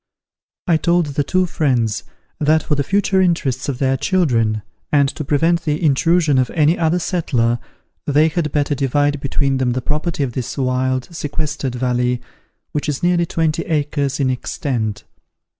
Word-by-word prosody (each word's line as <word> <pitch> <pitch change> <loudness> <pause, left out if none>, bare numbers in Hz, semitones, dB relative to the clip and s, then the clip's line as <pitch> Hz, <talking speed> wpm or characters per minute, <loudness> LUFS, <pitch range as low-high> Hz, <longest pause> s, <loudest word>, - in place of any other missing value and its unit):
I 170 -2 +3
told 170 +1 +2
the 145 - +1
two 185 +6 +1
friends 120 - 0 0.4
that 155 +1 +3
for - - -1
the 140 -1 +1
future 195 +4 +2
interests 145 -8 0
of 135 - -2
their 135 0 +1
children, 115 - +1 0.3
and 140 -2 +4
to 155 - -5
prevent 165 +4 +2
the 150 0 -1
intrusion 155 0 +3
of 130 - +1
any 155 +1 +4
other 165 0 +1
settler, 125 -10 0 0.5
they 150 +2 +4
had 160 -2 -1
better 145 0 +1
divide 145 +1 0
between 140 0 0
them 125 -2 +1
the 130 - -1
property 150 +1 -1
of 125 -3 -3
this 125 +2 -4
wild, 130 -1 0
sequestered 145 -4 -3
valley, 125 0 0 0.5
which 150 0 -2
is 145 +1 -3
nearly 175 -1 +2
twenty 160 0 0
acres 145 -3 -1
in 130 -2 +2
extent. 120 -4 -3
145 Hz, 160 wpm, -19 LUFS, 130-160 Hz, 0.5 s, and